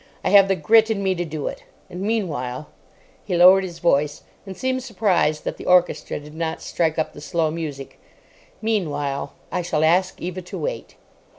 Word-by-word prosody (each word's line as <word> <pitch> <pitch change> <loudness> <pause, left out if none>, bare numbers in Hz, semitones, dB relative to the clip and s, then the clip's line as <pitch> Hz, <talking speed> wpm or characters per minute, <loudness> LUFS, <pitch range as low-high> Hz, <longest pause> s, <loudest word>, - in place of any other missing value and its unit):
I - - +2
have 200 -1 +7
the 195 - +2
grit 225 +3 +4
in 205 -3 -1
me 190 -1 +2
to 175 -1 -2
do 155 -2 -5
it. - - -5 0.3
And 180 - -8
meanwhile"—he 170 - -4
lowered 185 +2 +7
his 175 -3 -7
voice, 150 -4 +1 0.2
and 190 - -8
seemed 260 0 -1
surprised 190 -10 +1
that - - -4
the - - -9
orchestra 180 -4 +2
did 150 +1 -13
not 160 0 -4
strike 160 -2 -1
up 160 - -1
the 145 - -11
slow 160 0 0
music—"meanwhile, 150 +1 -5 0.2
I 180 - -1
shall 165 -3 -1
ask 180 +3 +2
Eva 180 +1 -5
to 180 - -8
wait." - - -5
175 Hz, 175 wpm, -22 LUFS, 155-195 Hz, 0.3 s, have